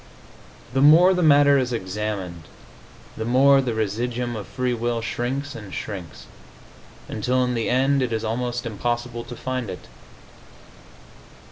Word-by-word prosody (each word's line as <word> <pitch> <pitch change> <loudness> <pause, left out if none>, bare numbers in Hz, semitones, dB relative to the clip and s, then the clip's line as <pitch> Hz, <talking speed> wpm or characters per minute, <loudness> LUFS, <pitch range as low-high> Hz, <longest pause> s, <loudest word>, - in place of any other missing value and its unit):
The 135 - +2
more 165 +6 +7
the 180 - 0
matter 145 -3 +5
is 125 -1 -1
examined 95 -5 -4 0.7
the 110 - -4
more 135 +4 +5
the 120 -4 -2
residuum 120 +3 -2
of 105 -4 -6
free 125 -1 -2
will 120 0 -1
shrinks 130 +5 -3
and 105 -6 -9
shrinks, 90 -2 -7 0.8
until 125 +4 0
in 125 0 -1
the 115 -2 -1
end 135 +2 +2
it 125 -2 -1
is 110 0 -2
almost 120 +2 -2
impossible 120 +1 -3
to 120 +1 -9
find 130 -3 -4
it. 90 - -8
120 Hz, 140 wpm, -23 LUFS, 110-130 Hz, 0.8 s, more